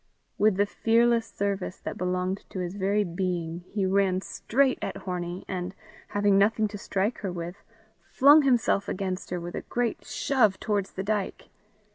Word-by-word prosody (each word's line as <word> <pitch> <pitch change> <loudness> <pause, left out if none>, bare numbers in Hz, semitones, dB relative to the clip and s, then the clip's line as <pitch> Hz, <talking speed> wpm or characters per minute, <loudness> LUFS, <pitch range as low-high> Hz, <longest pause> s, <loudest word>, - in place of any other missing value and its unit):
With 215 -1 +4
the 205 - +4
fearless 230 +2 +2
service 200 -2 -3
that - - -5
belonged 185 +1 -2
to - - -8
his 180 -1 -3
very 205 +1 +1
being, 175 -2 -2
he 200 -2 -1
ran 190 -1 +2
straight 265 +6 +1
at - - -3
Hornie, 180 -1 -4
and, 185 0 -4 0.3
having 205 -1 +3
nothing 215 +2 +3
to 205 - -6
strike 200 +4 -1
her 195 - -3
with, 175 +1 -6 0.5
flung 290 +3 +7
himself 240 -7 +2
against 185 0 -3
her 180 - -2
with 175 0 -6
a - - -3
great 240 -1 -2
shove 220 -8 +1
towards 205 -2 -1
the 190 - -4
dyke. 205 -1 -2
195 Hz, 165 wpm, -27 LUFS, 185-215 Hz, 0.5 s, flung